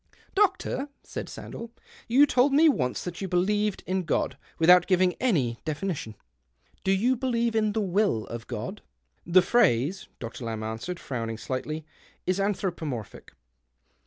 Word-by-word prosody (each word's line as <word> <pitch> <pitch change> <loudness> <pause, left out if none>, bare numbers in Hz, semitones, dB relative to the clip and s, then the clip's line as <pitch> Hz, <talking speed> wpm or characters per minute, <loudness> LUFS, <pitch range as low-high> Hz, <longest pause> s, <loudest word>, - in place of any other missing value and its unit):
"Doctor," 380 -8 +1
said - - -6
Sandell, 230 - -8 0.4
"you 265 +5 +6
told 270 0 +3
me 315 +3 +6
once 130 - +1
that 175 +1 -6
you 195 - -2
believed 205 +3 +1
in 185 0 0
God, 170 - 0 0.2
without 175 +1 +6
giving 185 -1 +3
any 140 - +1
definition. 155 - -3 0.7
Do 190 - +2
you 230 +7 +3
believe 235 -2 0
in 215 -1 +2
the 220 - 0
will 195 - +1
of 115 -1 -7
God? - - -5
" - - -48
" - - -41
The 185 - +9
phrase," 185 - +2
Dr. 115 +1 -7
Lamb 110 -1 -3
answered, 110 +11 -4
frowning 115 -4 -4
slightly, 150 +6 -4 0.4
"is 185 +1 +1
anthropomorphic. 175 - -3
185 Hz, 150 wpm, -27 LUFS, -, 0.7 s, The